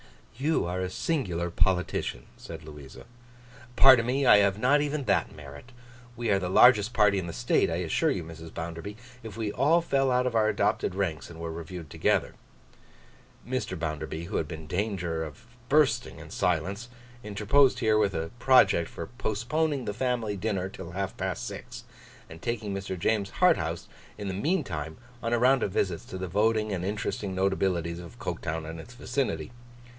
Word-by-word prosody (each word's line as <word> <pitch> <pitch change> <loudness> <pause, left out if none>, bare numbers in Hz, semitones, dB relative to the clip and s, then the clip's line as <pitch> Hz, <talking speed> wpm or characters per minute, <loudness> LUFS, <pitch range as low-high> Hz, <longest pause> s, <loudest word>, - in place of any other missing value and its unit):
'You 145 - +1
are 90 +2 -2
a 95 0 -2
singular 90 - -2
politician,' 90 -9 0
said 80 -1 -9
Louisa. 75 -3 -11 0.7
'Pardon 130 -3 +7
me; 135 +2 +1
I 105 - +8
have 100 -1 +3
not 130 +6 +3
even 145 0 -1
that - - 0
merit. 70 - -11 0.5
We 120 -2 -1
are 100 - +3
the 90 -2 -3
largest 110 +2 +6
party 105 -3 +4
in 90 - -4
the 85 - -5
state, 120 -1 +2
I 80 - -1
assure 85 -2 +1
you, 90 - -1
Mrs. 80 0 -10
Bounderby, 85 +5 -6 0.2
if 110 -2 -9
we 110 -2 -2
all 160 +9 +3
fell 135 -4 +1
out 125 0 +2
of 125 - 0
our 110 -1 +3
adopted 90 - 0
ranks 90 -6 -2
and 85 -1 -11
were 85 0 -4
reviewed 85 -1 -8
together.' - - +1 1.1
Mr. 125 -7 -2
Bounderby, 80 0 -4
who 100 - -3
had 80 - -1
been 80 0 -7
in - - -11
danger 90 -2 -2
of 75 +2 -10 0.2
bursting 135 -5 +2
in - - -11
silence, 95 +6 -1 0.3
interposed 110 +7 +3
here 110 -2 +3
with 100 -3 +1
a 80 0 -3
project 125 -10 +5
for 85 - -6
postponing 130 - -1
the 105 - -2
family 120 -3 -1
dinner 95 -2 -2
till 95 -3 -9
half 95 +1 -3
past - - -3
six, - - -8 0.4
and 80 +1 -12
taking 110 -4 -3
Mr. 95 -1 -4
James 100 +2 0
Harthouse - - +2 0.3
in 105 -1 -5
the 95 - -2
meantime 90 - -2 0.2
on 115 0 -1
a - - +4
round 130 +2 +4
of 100 - -1
visits 90 -3 -1
to 95 - -7
the 95 0 -4
voting 110 +3 +1
and 90 -3 -2
interesting 100 -1 -3
notabilities 95 -3 0
of 85 -1 -11
Coketown 80 +1 -4
and 80 +1 -7
its 120 +9 -11
vicinity. 120 - -2
100 Hz, 180 wpm, -28 LUFS, 85-120 Hz, 1.1 s, I